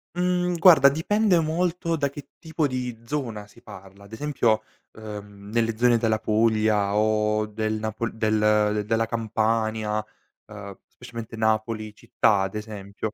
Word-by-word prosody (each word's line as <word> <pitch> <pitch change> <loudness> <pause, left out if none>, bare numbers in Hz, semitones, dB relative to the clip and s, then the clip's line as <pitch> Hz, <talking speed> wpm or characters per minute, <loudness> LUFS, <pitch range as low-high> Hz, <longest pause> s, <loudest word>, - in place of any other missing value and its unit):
Mhmm, 180 0 0
guarda 160 -6 +7
dipende 185 +5 +2
molto 165 +1 -1
da 140 -2 0
che 145 +1 -11
tipo 160 -2 -2
di 125 -3 -4
zona 115 -7 -4
si 100 - -20
parla. 95 +1 -13
Ad 100 - -16
esempio, 115 -3 0 0.3
ehm, 105 -2 -10
nelle 115 -1 0
zone 120 0 +4
della 110 -1 0
Puglia 110 -2 +1
o 105 0 +1
del 110 +1 -3
napol 110 +1 -3
del 105 -1 +2
della 115 +1 +1
Campania, 110 -1 -1 0.4
ehm, 100 -2 -9
specialmente 115 -2 -10
Napoli 110 -1 -1
città 105 -2 +1
ad 95 +2 -3
esempio 105 0 -6
110 Hz, 135 wpm, -24 LUFS, 105-125 Hz, 0.4 s, guarda